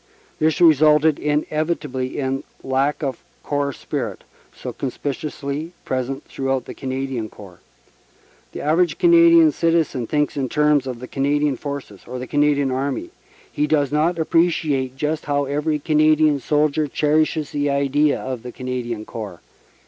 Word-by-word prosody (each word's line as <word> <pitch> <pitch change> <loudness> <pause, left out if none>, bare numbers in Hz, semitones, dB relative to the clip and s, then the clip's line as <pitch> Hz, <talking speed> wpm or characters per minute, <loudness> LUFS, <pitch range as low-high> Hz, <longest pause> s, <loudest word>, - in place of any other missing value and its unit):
This 155 -1 +2
resulted 155 -2 +5
inevitably 150 -3 -1
in 135 -1 -2 0.2
lack 135 +4 0
of 135 -4 -3 0.2
corps 145 -1 -1
spirit, - - -5 0.3
so - - -7
conspicuously 145 +3 -4
present 130 +2 -3
throughout 135 -1 -2
the - - -8
Canadian 130 -4 -4
Corps. 95 -5 -14 0.9
The - - -6
average 165 +3 +2
Canadian 335 -2 +6
citizen 165 - 0
thinks 150 -1 0
in 135 -3 -2
terms 150 -2 +2
of 125 -2 -5
the 125 - -7
"Can 135 - -3
adian 145 -1 +2
Forces," 140 -7 -7
or 125 - -5
the 125 - -5
"Canadian 145 0 +2
Army"; 140 - -2 0.4
he 150 - 0
does 145 -3 +1
not 155 +4 +2
appre 165 +1 +3
ciate 135 -6 -2
just 150 +3 -2
how 145 -1 0
every 150 +2 -1
Canadian 155 -1 +3
soldier 150 +2 +1
cherishes 155 +1 +1
the 145 0 0
idea 140 +1 +2
of 130 -3 -5
the 125 +1 -8
"Canadian 120 -3 -4
Corps." 105 -7 -7
145 Hz, 145 wpm, -21 LUFS, 130-155 Hz, 0.9 s, Canadian